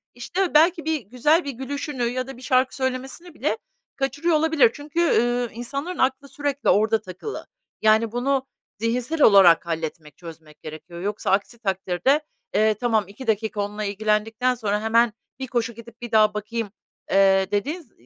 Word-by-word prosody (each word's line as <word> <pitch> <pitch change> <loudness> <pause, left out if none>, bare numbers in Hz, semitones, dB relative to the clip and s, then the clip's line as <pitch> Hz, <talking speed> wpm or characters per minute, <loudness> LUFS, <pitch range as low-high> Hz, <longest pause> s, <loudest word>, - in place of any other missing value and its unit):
işte, 355 +10 -2
belki 325 +1 +4
bir 315 -2 0
güzel 255 - +2
bir 280 - -3
gülüşünü 265 +1 -4
ya 250 +2 -2
da 270 -2 -9
bir - - -14
şarkı 255 0 +1
söylemesini 265 +6 -4
bile - - -1 0.4
kaçırıyor 290 +5 0
olabilir. 305 -7 +4
Çünkü, 300 +3 -5
ııı, 245 -7 +2
insanların 275 +9 -5
aklı 265 +2 0
sürekli 285 0 -2
orada 220 +1 +3
takılı. 185 - -8 0.3
Yani, 220 +1 +3
bunu 265 +2 0 0.3
zihinsel 245 +8 -1
olarak 190 -5 +7
halletmek, 160 -3 -5
çözmek 160 -3 -13
gerekiyor. 160 +3 -9
Yoksa 205 +1 -2
aksi 205 +4 0
takdirde, 195 - 0 0.3
eee, 215 0 +3
tamam, 220 0 +1
2 230 +6 -11
dakika 220 -1 0
onunla 210 +1 -4
ilgilendikten 215 +4 0
sonra 210 -2 -1
hemen 230 0 +3 0.3
bir 265 - -4
koşu 235 -2 -1
gidip 230 +1 -14
bir 240 -1 -7
daha 215 -1 +4
bakayım, 210 0 -4 0.4
eee, 195 0 +4
dediğin 290 - -1
z 255 - -24
235 Hz, 160 wpm, -23 LUFS, 210-270 Hz, 0.4 s, olarak